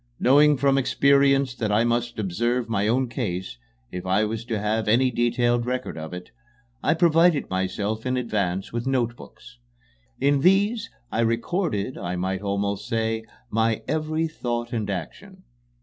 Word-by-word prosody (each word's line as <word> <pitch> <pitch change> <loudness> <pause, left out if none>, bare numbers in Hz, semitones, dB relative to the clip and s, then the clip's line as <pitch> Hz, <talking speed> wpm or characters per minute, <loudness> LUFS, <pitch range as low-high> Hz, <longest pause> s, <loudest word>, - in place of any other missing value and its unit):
Knowing 145 +2 +5
from 135 +1 +3
experience 140 0 +3
that 110 -4 -2
I 105 +2 +3
must 120 0 -1
observe 115 +5 -1
my 105 -2 0
own 130 +3 +2
case, 90 - -4 0.3
if 90 0 -5
I 95 +3 +2
was 110 +1 -4
to 115 -2 -2
have 105 +2 -1
any 125 +4 +3
detailed 120 0 +1
record 125 0 -3
of 80 -1 -7
it, 90 0 -8 0.5
I - - +2
provided 165 - +3
myself 100 +4 -2
in 130 0 -1
advance 100 -6 -2
with 120 +2 -3
notebooks. 125 0 -4 0.6
In 140 0 +3
these 200 - +2 0.2
I - - -2
recorded, 115 - -1
I 90 +1 -3
might 95 +1 -2
almost 100 0 -2
say, 110 0 -1 0.3
my 110 0 +1
every 155 +1 -1
thought 120 -7 -4
and 110 -3 -2
action. 185 - -6
120 Hz, 150 wpm, -24 LUFS, 105-135 Hz, 0.6 s, Knowing